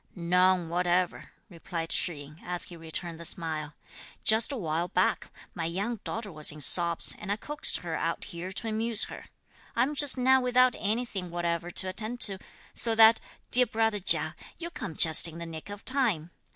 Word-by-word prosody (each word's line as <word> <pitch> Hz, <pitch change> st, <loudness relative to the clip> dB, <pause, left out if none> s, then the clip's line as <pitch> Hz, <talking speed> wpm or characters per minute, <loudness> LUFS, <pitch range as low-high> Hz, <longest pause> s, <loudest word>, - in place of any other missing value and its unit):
"None 180 Hz, 0 st, +2 dB
whatever," 180 Hz, +1 st, -1 dB, 0.2 s
replied 165 Hz, -3 st, -6 dB
Shih 175 Hz, -, +2 dB
yin, 145 Hz, +2 st, -12 dB
as 175 Hz, 0 st, 0 dB
he 175 Hz, -, -6 dB
returned 165 Hz, 0 st, -6 dB
the -, -, -8 dB
smile. 155 Hz, -3 st, -3 dB, 0.5 s
"Just 220 Hz, +4 st, +5 dB
a 275 Hz, -, -3 dB
while 165 Hz, -3 st, -2 dB
back, 185 Hz, +1 st, 0 dB, 0.2 s
my 165 Hz, -, -4 dB
young 200 Hz, +7 st, -3 dB
daughter 215 Hz, -2 st, -5 dB
was 155 Hz, -1 st, +2 dB
in 150 Hz, -, -11 dB
sobs, 170 Hz, +3 st, +3 dB
and 205 Hz, -1 st, -5 dB
I -, -, +1 dB
coaxed 295 Hz, +8 st, 0 dB
her 170 Hz, -2 st, -6 dB
out 165 Hz, +1 st, -3 dB
here 175 Hz, +2 st, -7 dB
to 225 Hz, +4 st, -5 dB
amuse 225 Hz, 0 st, +2 dB
her. -, -, -10 dB, 0.5 s
I 235 Hz, -, +3 dB
am 285 Hz, +4 st, -2 dB
just 290 Hz, -2 st, +3 dB
now 260 Hz, +1 st, +4 dB
without 250 Hz, 0 st, +3 dB
anything 210 Hz, -4 st, -3 dB
whatever 170 Hz, 0 st, -3 dB
to 185 Hz, -, -1 dB
attend 215 Hz, +5 st, -3 dB
to, 195 Hz, -2 st, +2 dB, 0.3 s
so 230 Hz, -1 st, 0 dB
that, 225 Hz, 0 st, +7 dB, 0.3 s
dear 250 Hz, 0 st, +7 dB
brother 225 Hz, -1 st, 0 dB
Chia, 195 Hz, -, +3 dB, 0.2 s
you 340 Hz, 0 st, -6 dB
come 165 Hz, -, -7 dB
just 160 Hz, +1 st, +5 dB
in 165 Hz, 0 st, -9 dB
the 170 Hz, -, -7 dB
nick 160 Hz, +2 st, -9 dB
of 205 Hz, 0 st, -10 dB
time. 225 Hz, -, 0 dB
185 Hz, 190 wpm, -28 LUFS, 170-225 Hz, 0.5 s, that